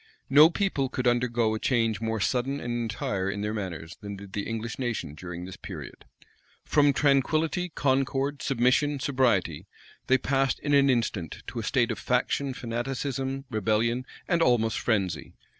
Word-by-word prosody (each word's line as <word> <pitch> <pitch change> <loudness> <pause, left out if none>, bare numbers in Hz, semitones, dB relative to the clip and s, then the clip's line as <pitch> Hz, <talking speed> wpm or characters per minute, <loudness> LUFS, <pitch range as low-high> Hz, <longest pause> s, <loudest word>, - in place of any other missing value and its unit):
No 150 +4 +9
people 170 -8 0
could 125 -1 -2
undergo 120 -2 +2
a 110 - -2
change 115 -5 +1
more 110 -1 -1
sudden 125 +6 0
and 120 -3 -3
entire 105 -5 -2
in 100 +1 -3
their 105 +1 -2
manners, 90 -5 -5
than 100 -1 -6
did 100 0 -11
the 100 - -3
English 115 +1 -4
nation 120 - -2
during 90 +2 -7
this 95 +2 -9
period. 80 -11 -9 0.6
From 145 -1 +4
tranquillity, 155 +6 +2
concord, 135 -1 0
submission, 135 +3 +2
sobriety, 105 - +1 0.4
they 130 - +5
passed 135 +1 +1
in 145 - 0
an 140 -1 +5
instant 110 - -1
to 120 - -5
a - - -4
state 120 +1 +1
of 110 - -4
faction, 130 +2 0
fanaticism, 135 +3 -3
rebellion, 115 +4 0 0.2
and 170 -2 +2
almost 115 -6 +2
frenzy. 95 -8 -1
120 Hz, 160 wpm, -27 LUFS, 105-135 Hz, 0.6 s, No